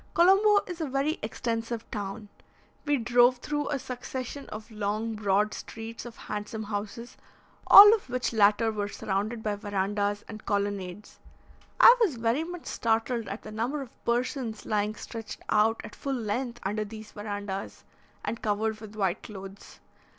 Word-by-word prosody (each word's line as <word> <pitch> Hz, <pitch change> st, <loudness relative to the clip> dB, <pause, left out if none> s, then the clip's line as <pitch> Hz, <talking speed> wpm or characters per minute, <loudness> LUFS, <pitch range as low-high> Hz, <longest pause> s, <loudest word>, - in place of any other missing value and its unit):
Colombo 390 Hz, +4 st, +6 dB
is 355 Hz, -2 st, -6 dB
a 315 Hz, -, -1 dB
very 275 Hz, +4 st, 0 dB
extensive 230 Hz, +1 st, -3 dB
town. 205 Hz, 0 st, -5 dB, 0.6 s
We 290 Hz, -1 st, +2 dB
drove 245 Hz, +1 st, +4 dB
through 295 Hz, +3 st, -3 dB
a 285 Hz, -, 0 dB
succession 255 Hz, +1 st, -6 dB
of 215 Hz, +2 st, -8 dB
long, 215 Hz, +1 st, -2 dB
broad 210 Hz, 0 st, +1 dB
streets 225 Hz, +1 st, -7 dB
of 235 Hz, -, -11 dB
handsome 210 Hz, +1 st, -5 dB
houses, 210 Hz, +3 st, -5 dB, 0.5 s
all 415 Hz, +2 st, +11 dB
of 435 Hz, -, -2 dB
which 250 Hz, -1 st, -1 dB
latter 215 Hz, +1 st, +4 dB
were 205 Hz, -1 st, -2 dB
surrounded 210 Hz, +3 st, -3 dB
by 210 Hz, -1 st, -1 dB
verandahs 205 Hz, 0 st, -1 dB
and 215 Hz, -1 st, -9 dB
colonnades. 200 Hz, -1 st, -3 dB, 0.6 s
I 475 Hz, -, +10 dB
was 375 Hz, -, +3 dB
very 230 Hz, +6 st, 0 dB
much 350 Hz, 0 st, -7 dB
startled 230 Hz, 0 st, 0 dB
at 200 Hz, -, -6 dB
the 215 Hz, -, -8 dB
number 235 Hz, +7 st, -2 dB
of 255 Hz, -, -17 dB
persons 240 Hz, -2 st, -1 dB
lying 210 Hz, 0 st, 0 dB
stretched 225 Hz, 0 st, -8 dB
out 220 Hz, +1 st, +3 dB
at -, -, -9 dB
full 275 Hz, -, -3 dB
length 240 Hz, +1 st, -3 dB
under 210 Hz, +2 st, -1 dB
these 215 Hz, 0 st, -10 dB
verandahs, 205 Hz, -2 st, -5 dB, 0.4 s
and 230 Hz, -, -3 dB
covered 215 Hz, +1 st, -1 dB
with 215 Hz, -1 st, -10 dB
white 195 Hz, -1 st, 0 dB
clothes. 195 Hz, -1 st, -10 dB
220 Hz, 155 wpm, -28 LUFS, 205-245 Hz, 0.6 s, all